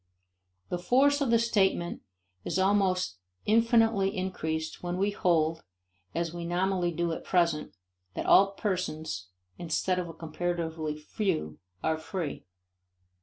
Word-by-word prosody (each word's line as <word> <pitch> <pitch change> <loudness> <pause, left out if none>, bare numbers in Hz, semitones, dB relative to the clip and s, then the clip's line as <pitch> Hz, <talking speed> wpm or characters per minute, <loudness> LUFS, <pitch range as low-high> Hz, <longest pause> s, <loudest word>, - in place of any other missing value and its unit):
The 180 - -2
force 280 +9 +3
of 275 - +1
the 230 - +5
statement 195 -6 +1 0.4
is - - -2
almost 190 - +2 0.3
infinitely 225 -3 +3
increased 160 -4 -3
when 175 0 -3
we 200 +2 +1
hold, 165 -4 +1 0.5
as 170 0 -1
we 175 0 -5
nominally 175 +1 0
do 170 +1 -1
at 160 - -4
present, 170 -4 +1 0.4
that - - -3
all 195 0 +6
persons, 160 - -3 0.3
instead 180 +2 0
of 175 -2 -4
a - - -7
comparatively 160 -1 -3
few, 150 - -2 0.2
are 160 0 +1
free. 165 -2 -5
175 Hz, 125 wpm, -29 LUFS, 160-195 Hz, 0.5 s, all